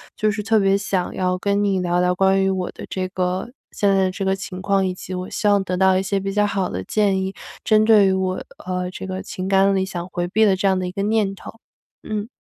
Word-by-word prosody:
就 215 0 +1
是 210 - -3
特 220 +1 +2
别 195 0 +3
想 195 -2 -1
要 180 0 0
跟 200 +2 0
你 195 -2 +1
聊 175 0 +1
聊 180 0 +2
关 195 0 +3
于 190 - +2
我 185 -2 -2
的 - - -11
这 185 -1 -2
个 185 +5 -2 0.2
现 205 - 0
在 195 -1 +3
的 185 - +1
这 195 +1 -4
个 190 0 +2
情 185 -1 -7
况， 195 0 +1
以 185 - -1
及 185 - -8
我 180 0 -4
希 210 - -1
望 200 -1 +4
得 185 -1 -3
到 190 0 +4
一 190 - +1
些 195 +1 -1
比 195 0 -3
较 210 0 +2
好 195 -3 -1
的 95 - -4
建 195 - +1
议 190 +1 -4 0.3
针 215 -1 +4
对 215 -3 +6
于 - - +3
我， 185 -1 -1 0.2
呃， 180 0 -2
这 185 - -7
个 190 0 -4
情 185 0 -6
感 195 0 +3
里 190 0 +1
想 175 -2 -5
回 175 0 -2
避 215 +5 +2
的 195 - +4
这 195 +1 0
样 190 -1 +2
的 185 - -2
一 - - -5
个 195 +1 -3
念 210 -2 +1
头。 195 - -10 0.5
嗯。 210 0 -4
190 Hz, 290 characters per minute, -21 LUFS, 185-200 Hz, 0.5 s, 对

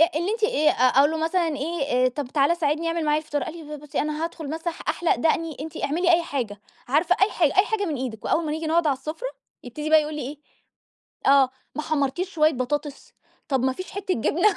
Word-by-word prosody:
اللي 345 +6 0
أنتِ 445 -1 -3
آآ، 305 -7 +3 0.3
أقول 290 +3 +5
له 320 - -2
مثلًا 330 +2 +1
إيه 275 -5 +1
طَب 270 +1 -5
تعالَ 290 +5 +2
ساعدني، 315 +1 0
اعمل 330 -1 -1
معايا 300 0 +3
الفطار، 295 -2 -3
قال 325 - -6
لي 300 0 -6
ب - - -13
بُصّي، 295 - -4
أنا 305 +2 -2
هادخل 325 -3 -5
مثلًا 325 +2 -3
أح - - -14
أحلق 345 - +1
دقني، 320 +3 0
أنتِ 320 +1 -7
اعملي 340 +5 +2
أي 340 0 +4
حاجة، 230 -10 -4 0.3
عارفة 320 +7 +3
أي 400 - +5
حاجة 325 -1 +1
أي 405 - +5
حاجة 435 -2 -1
من 310 -4 -2
إيدِك 240 -4 -5
وأوّل 325 0 +1
ما 300 - -2
نيجي 320 +1 -3
نقعد 330 0 +2
عالسفرة، 310 - -2 0.4
يبتدي 300 +5 -5
بقى 315 -1 +7
يقول 300 0 -5
لي 295 - -4
إيه، 275 +4 -6 1.0
آه 270 -2 +5 0.2
ما 305 - -3
حمّرتيش 310 +5 -1
شويّة 310 -3 +3
بطاطس، 285 +3 -3 0.4
طَب 265 -3 +1
ما 260 - +2
فيش 370 +7 -8
حتّة 390 -1 -2
جبنة. 350 - +2
310 Hz, 225 wpm, -24 LUFS, 285-335 Hz, 1.0 s, بقى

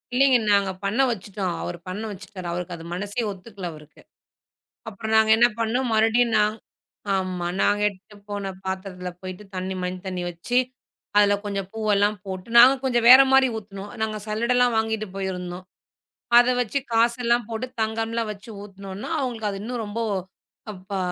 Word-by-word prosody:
இல்லங்க. 265 -1 +5
நாங்க 200 -1 +3
பண்ண 220 +7 +1
வச்சுட்டோம். 195 -4 -3
அவரு 175 - -4
பண்ண 200 +4 -4
வச்சுட்டாரு. 190 -2 -8
அவருக்கு 175 0 -4
அது 165 0 -10
மனசெ 205 +5 -3
ஒத்துக்கல 195 -1 -8
அவருக்கு. 150 0 -15 0.9
அப்றம் 220 +2 -4
நாங்க 220 0 +4
என்ன 240 - +6
பண்னோம். 240 +3 0 0.5
நா 210 - +5 0.7
ஆம்மா. 185 -2 -2
நாங்க 205 0 +2
எடுத்துட்டு 205 +1 -9
போன 205 -1 -3 0.2
பாத்திரத்துல 190 -1 -4
போயிட்டு 185 +2 -7
தண்ணி, 185 +1 -3
மஞ்ச 180 0 -3
தண்ணி 185 -1 -3
வச்சு 175 +9 -2 0.6
அதுல 205 -1 +5
கொஞ்சம் 200 -2 -3
பூவுல்லாம் 210 -1 +2
போட்டு 190 +2 -6
நாங்க 250 +3 +9
கொஞ்சம் 240 -3 +1
வேற 260 +2 +11
மாதிரி 265 0 +6
ஊத்துனோம். 200 -1 -8
நாங்க 215 -1 -1
சல்லடல்லாம் 235 +2 +2
வாங்கிட்டு 220 -1 -1
போயிருந்தோம். 180 -1 -4 0.7
அதை 245 +1 +6
வச்சு 245 +4 -1
காசு 235 +1 +3
எல்லாம் 235 -1 +2
போட்டுத் 250 +3 -5
தங்கமல்லாம் 225 0 -1
வச்சு 210 +3 -11
ஊத்துனோன்ன, 195 +3 -8
அவங்களுக்கு 230 -5 -2
அது 195 - -6
இன்னும் 240 -1 -4
ரொம்போ 225 +3 -3 0.7
அப்பா 190 0 -6
205 Hz, 150 wpm, -24 LUFS, 190-230 Hz, 0.9 s, வேற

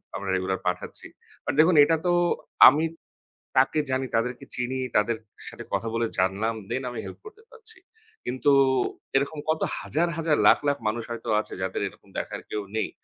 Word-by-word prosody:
আমরা 100 - -4
রেগুলার 95 0 -1
পাঠাচ্ছি। 90 0 -4 0.4
বাট - - -1
দেখুন, 160 +3 +6
এটা 160 +3 +3
তো 175 - +3 0.6
আমি 150 +4 +1 0.7
তাকে 135 +4 +4
জানি, 130 0 0
তাদেরকে 125 +2 -1
চিনি। 125 +1 -2 0.2
তাদের 110 +2 +1 0.3
সাথে - - -9
কথা 115 - -1
বলে 115 0 +1
জানলাম, 100 +5 +1
দেন, 130 - -2
আমি 120 - -6
হেল্প - - -9
করতে 430 +1 -13
পারছি। 445 -1 -12 0.5
কিন্তু 130 +3 +1 0.6
এরকম 140 +3 +1
কত 160 - +1 0.2
হাজার, 170 +3 0
হাজার, 160 -2 +2
লাখ, - - +7
লাখ, 145 - +2
মানুষ 115 +2 -1
হয়তো 115 -1 -5
আছে, - - -10
যাদের 95 +1 -2
এরকম - - -15
দেখার - - -5
কেউ 105 - -2
নেই। 110 - 0
125 Hz, 170 wpm, -26 LUFS, 110-155 Hz, 0.7 s, লাখ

